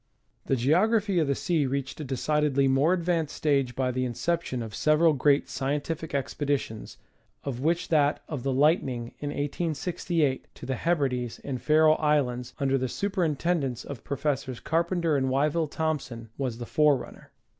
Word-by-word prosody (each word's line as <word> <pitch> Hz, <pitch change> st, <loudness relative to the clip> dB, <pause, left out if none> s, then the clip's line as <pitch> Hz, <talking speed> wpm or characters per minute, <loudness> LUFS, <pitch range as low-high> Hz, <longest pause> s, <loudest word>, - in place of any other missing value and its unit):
The 135 Hz, -, +2 dB
Geography 190 Hz, -, +2 dB
of 155 Hz, -, +1 dB
the 140 Hz, -, +1 dB
Sea 155 Hz, -3 st, 0 dB
reached 135 Hz, +2 st, -3 dB
a -, -, -4 dB
decidedly 140 Hz, +1 st, +1 dB
more 135 Hz, +5 st, +3 dB
advanced 170 Hz, -4 st, 0 dB
stage 140 Hz, -5 st, +1 dB
by 130 Hz, -1 st, 0 dB
the 130 Hz, +1 st, -1 dB
inception 125 Hz, 0 st, -2 dB
of 110 Hz, -1 st, -8 dB
several 155 Hz, +1 st, +3 dB
great 140 Hz, 0 st, +3 dB
scientific 150 Hz, +3 st, -3 dB
expeditions, 140 Hz, -4 st, -2 dB, 0.5 s
of 130 Hz, -4 st, -4 dB
which 170 Hz, +5 st, 0 dB
that 150 Hz, -2 st, +2 dB
of 145 Hz, -5 st, -4 dB
the 135 Hz, -, -1 dB
Lightning, 130 Hz, -4 st, +1 dB
in 145 Hz, -, -3 dB
1868, 155 Hz, 0 st, -1 dB
to -, -, -10 dB
the 135 Hz, -, -2 dB
Hebrides 130 Hz, -6 st, -1 dB
and 130 Hz, -3 st, -4 dB
Faroe 155 Hz, 0 st, +5 dB
Islands, 130 Hz, -5 st, 0 dB
under 135 Hz, -2 st, +1 dB
the 130 Hz, 0 st, -2 dB
superintendence 170 Hz, -, -1 dB
of 135 Hz, -6 st, -8 dB
Professors 140 Hz, -3 st, -2 dB
Carpenter 170 Hz, -1 st, 0 dB
and 130 Hz, -1 st, +1 dB
Wyville 150 Hz, +4 st, +1 dB
Thompson, 140 Hz, -8 st, -3 dB
was 130 Hz, -4 st, -3 dB
the 120 Hz, -, -6 dB
forerunner. 145 Hz, -1 st, +1 dB
145 Hz, 155 wpm, -27 LUFS, 130-160 Hz, 0.5 s, Faroe